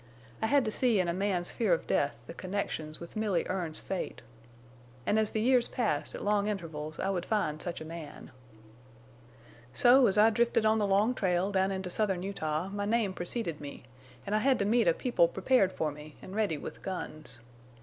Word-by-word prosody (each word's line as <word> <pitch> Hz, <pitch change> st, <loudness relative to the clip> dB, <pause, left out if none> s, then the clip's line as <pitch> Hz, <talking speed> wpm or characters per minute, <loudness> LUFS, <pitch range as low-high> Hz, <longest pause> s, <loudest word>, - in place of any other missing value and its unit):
I 220 Hz, -, +2 dB
had 280 Hz, +1 st, +3 dB
to 215 Hz, -, -1 dB
see 235 Hz, -3 st, +2 dB
in 180 Hz, -, +1 dB
a 170 Hz, -, 0 dB
man's 185 Hz, -2 st, -1 dB
fear 215 Hz, -6 st, +1 dB
of 165 Hz, -, -1 dB
death 140 Hz, -4 st, +1 dB
the 165 Hz, -, -8 dB
connections 170 Hz, -5 st, -4 dB
with 170 Hz, -, -10 dB
Milly 210 Hz, -6 st, 0 dB
Erne's 175 Hz, -4 st, -3 dB
fate. 190 Hz, -9 st, -5 dB, 0.8 s
An' 215 Hz, -, +2 dB
as 215 Hz, -1 st, +2 dB
the 220 Hz, -, -2 dB
years 250 Hz, +1 st, +4 dB
passed 210 Hz, -, -1 dB
at -, -, -6 dB
long 205 Hz, 0 st, +2 dB
intervals 160 Hz, -6 st, -5 dB
I 195 Hz, -, 0 dB
would 180 Hz, -3 st, -2 dB
find 155 Hz, -9 st, -1 dB
such 175 Hz, -2 st, -3 dB
a -, -, -6 dB
man. 160 Hz, -2 st, -9 dB, 1.4 s
"So 250 Hz, +1 st, +6 dB
as 195 Hz, -, +1 dB
I 215 Hz, +2 st, +6 dB
drifted 235 Hz, 0 st, +2 dB
on 220 Hz, 0 st, +4 dB
the 205 Hz, -, +1 dB
long 205 Hz, +5 st, +3 dB
trail 185 Hz, -3 st, 0 dB
down 190 Hz, -1 st, +2 dB
into 190 Hz, -2 st, -3 dB
southern 190 Hz, -3 st, 0 dB
Utah 170 Hz, -3 st, -2 dB
my 205 Hz, 0 st, -3 dB
name 215 Hz, -2 st, +1 dB
preceded 175 Hz, -3 st, -3 dB
me, 140 Hz, -3 st, -8 dB, 0.4 s
an' 200 Hz, -, -3 dB
I 215 Hz, -, +3 dB
had 265 Hz, +2 st, +3 dB
to 200 Hz, -, 0 dB
meet 225 Hz, 0 st, +3 dB
a 170 Hz, -, +5 dB
people 240 Hz, -9 st, +3 dB
prepared 190 Hz, +2 st, +2 dB
for 155 Hz, -4 st, -2 dB
me, 150 Hz, +1 st, -11 dB
an' -, -, -9 dB
ready 205 Hz, -7 st, 0 dB
with -, -, -8 dB
guns. 155 Hz, -9 st, -5 dB
195 Hz, 200 wpm, -30 LUFS, 170-215 Hz, 1.4 s, So